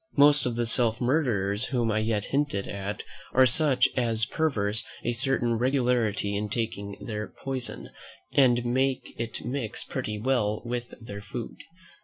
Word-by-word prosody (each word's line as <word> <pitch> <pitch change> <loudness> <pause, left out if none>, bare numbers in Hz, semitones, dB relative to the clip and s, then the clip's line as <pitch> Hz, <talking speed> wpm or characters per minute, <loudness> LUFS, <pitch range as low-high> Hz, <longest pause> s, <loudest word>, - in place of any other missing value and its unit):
Most 145 -1 +6
of 120 - -2
the 120 0 0
self 115 0 +4
murderers 120 -6 +1
whom 120 -4 0
I 110 - +1
yet 110 -2 0
hinted 140 -8 0
at 100 +1 -4 0.3
are 130 +1 +6
such 130 0 +3
as 115 -3 +1
preserve 110 -10 0 0.2
a 120 - 0
certain 120 -2 0
regularity 120 -6 +1
in 105 +1 -2
taking 100 -2 -3
their 105 -2 -4
poison, 130 -2 -4 0.4
and 120 -3 +4
make 130 +2 0
it 115 -1 -2
mix 125 -4 -3
pretty 110 -5 -4
well 110 -3 +1
with 120 0 -4
their 100 -3 -8
food. 110 +3 -6
120 Hz, 150 wpm, -27 LUFS, 105-130 Hz, 0.4 s, Most